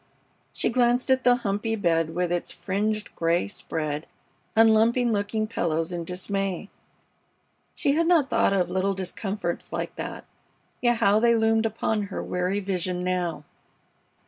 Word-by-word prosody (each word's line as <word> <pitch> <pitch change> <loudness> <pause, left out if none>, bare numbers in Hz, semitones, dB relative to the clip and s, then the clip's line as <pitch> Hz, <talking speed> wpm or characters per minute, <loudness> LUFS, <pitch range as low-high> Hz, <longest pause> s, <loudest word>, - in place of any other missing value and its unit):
She - - 0
glanced 245 +1 +2
at 260 0 +3
the 245 0 +5
humpy 225 -1 -1
bed 165 -5 0
with 180 -1 0
its 175 0 -1
fringed 210 +2 -2
gray 170 +1 +1
spread 155 -6 -4 0.5
and 225 0 +6
lumpy 235 +3 +3
looking 215 -1 0
pillows 165 -6 -1
in 170 -1 -4
dismay. 195 +2 -3 1.0
She 280 - +1
had 330 +3 +2
not 330 -6 +4
thought 230 -4 +2
of 185 -3 +1
little 190 +1 0
discomforts 190 -1 -4
like - - -4
that, - - -6 0.6
yet 240 -1 +3
how 205 0 +4
they 235 +1 +4
loomed 225 0 +3
upon 220 0 -1
her - - -4
weary 180 +3 -1
vision 185 -2 -2
now! 180 -4 -1
200 Hz, 145 wpm, -25 LUFS, 180-225 Hz, 1.0 s, and